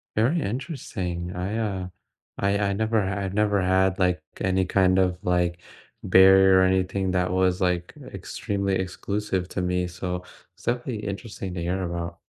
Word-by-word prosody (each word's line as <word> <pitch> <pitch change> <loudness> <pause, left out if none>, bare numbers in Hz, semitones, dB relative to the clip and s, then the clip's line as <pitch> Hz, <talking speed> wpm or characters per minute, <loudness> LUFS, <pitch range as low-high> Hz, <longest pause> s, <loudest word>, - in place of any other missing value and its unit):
Very 130 +10 +2
interesting. 95 - -4
I, 95 +5 -2
uh 100 -5 -2 0.5
I 100 +1 +1
I 100 -1 0
never 110 +2 +1
I've 95 0 -2
never 105 -1 +2
had, 95 +1 +2
like, 90 -3 +2 0.2
any 95 0 +1
kind 95 0 +3
of, 90 -1 +2
like, 90 -1 +1 0.4
barrier 95 0 +7
or - - +5
anything 95 0 +1
that 90 -1 0
was, 95 -1 +2
like, 90 -1 0 0.2
extremely 100 -1 -2
exclusive 95 0 -2
to 95 - -3
me, 90 0 0
so, 90 0 -4 0.3
it's - - -20
definitely 120 -3 -2
interesting 100 -1 -5
to 85 - -4
hear 90 +3 -1
about. 85 -1 -4
95 Hz, 155 wpm, -25 LUFS, 90-100 Hz, 0.5 s, barrier